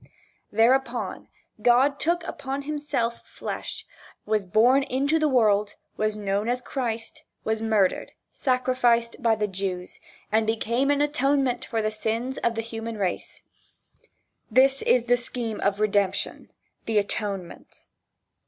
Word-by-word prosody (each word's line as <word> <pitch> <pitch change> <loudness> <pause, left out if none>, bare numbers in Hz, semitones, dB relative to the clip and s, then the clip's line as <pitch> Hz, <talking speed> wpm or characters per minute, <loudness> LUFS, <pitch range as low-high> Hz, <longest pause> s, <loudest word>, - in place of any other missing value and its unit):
Thereupon 245 +5 +1 0.3
God 265 +4 +4
took 340 +1 +1
upon 270 +1 -4
himself 285 -6 -2
flesh, - - -6 0.4
was 210 -2 0
born 245 +8 +5
into 275 +4 +1
the 310 - +3
world 210 -6 +2 0.2
was 215 0 -1
known 205 +2 -1
as 250 +1 0
Christ 235 -3 -4 0.2
was 220 0 -1
murdered, 215 -4 +1 0.2
sacrificed 250 -3 +1
by 230 -2 +3
the 210 -1 0
Jews, 190 -2 -4 0.3
and 220 0 +2
became 235 +4 0
an 290 0 +3
atonement 275 -3 +1
for 225 -4 -2
the 215 - 0
sins 225 +4 -2
of 235 0 0
the 225 - -1
human 225 0 -6
race. 190 -3 -3 1.1
This 265 +3 +4
is 245 -2 +3
the 245 0 +4
scheme 235 -2 -4
of 200 +1 +1
Redemption, 200 -2 0 0.4
the 225 -1 +1
atonement. 200 -3 -3
230 Hz, 130 wpm, -25 LUFS, 215-260 Hz, 1.1 s, born